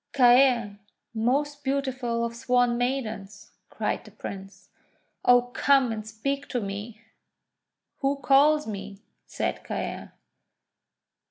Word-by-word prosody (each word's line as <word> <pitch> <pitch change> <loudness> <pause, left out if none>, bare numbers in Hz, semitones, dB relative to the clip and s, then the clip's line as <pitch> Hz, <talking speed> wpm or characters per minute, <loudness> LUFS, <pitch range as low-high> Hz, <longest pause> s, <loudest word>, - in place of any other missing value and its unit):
'Caer, 245 -5 +4 0.3
most 285 +6 0
beautiful 260 -4 -1
of 235 0 -5
Swan 245 0 +2
Maidens!' 235 -5 -3 0.2
cried - - -2
the - - -13
Prince. 195 0 -9 0.5
;<Oh, 245 0 +6
come 270 -4 +3
and 215 -1 -5
speak 275 +6 -3
to 250 - -2
me!' 205 +2 -6 1.0
'Who 275 0 +1
calls 285 +3 +4
me?" 200 -1 -7 0.2
said - - -3
Caer. - - -5
245 Hz, 105 wpm, -26 LUFS, 215-275 Hz, 1.0 s, <Oh